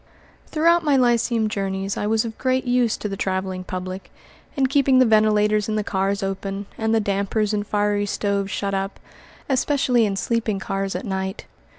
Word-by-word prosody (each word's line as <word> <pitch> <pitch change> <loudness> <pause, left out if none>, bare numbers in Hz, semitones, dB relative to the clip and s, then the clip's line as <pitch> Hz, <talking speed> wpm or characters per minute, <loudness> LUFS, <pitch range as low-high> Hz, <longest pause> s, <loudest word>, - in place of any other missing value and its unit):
Throughout 335 +2 +3
my 295 -3 +3
lyceum 235 -2 +2
journeys 195 -2 -2
I 205 - -2
was 220 +1 +1
of 225 -1 -5
great 260 0 0
use 245 -2 +2
to - - -4
the 195 - -4
traveling 190 -1 -2
public, 185 +1 -6 0.4
in 275 -2 +2
keeping 270 0 +3
the 255 - +6
ventilators 215 -1 +3
in 215 - 0
the 215 - 0
cars 195 +1 -1
open, 195 +1 -3
and 220 0 -1
the - - +4
dampers 205 +1 0
in 210 - +1
fiery 205 0 0
stoves 200 -1 -1
shut 200 -1 -2
up, 195 0 -3 0.5
especially 260 -4 +2
in 195 - -2
sleeping 225 0 -1
cars 195 0 -3
at - - -4
night. 190 -1 -3
210 Hz, 180 wpm, -22 LUFS, 195-235 Hz, 0.5 s, the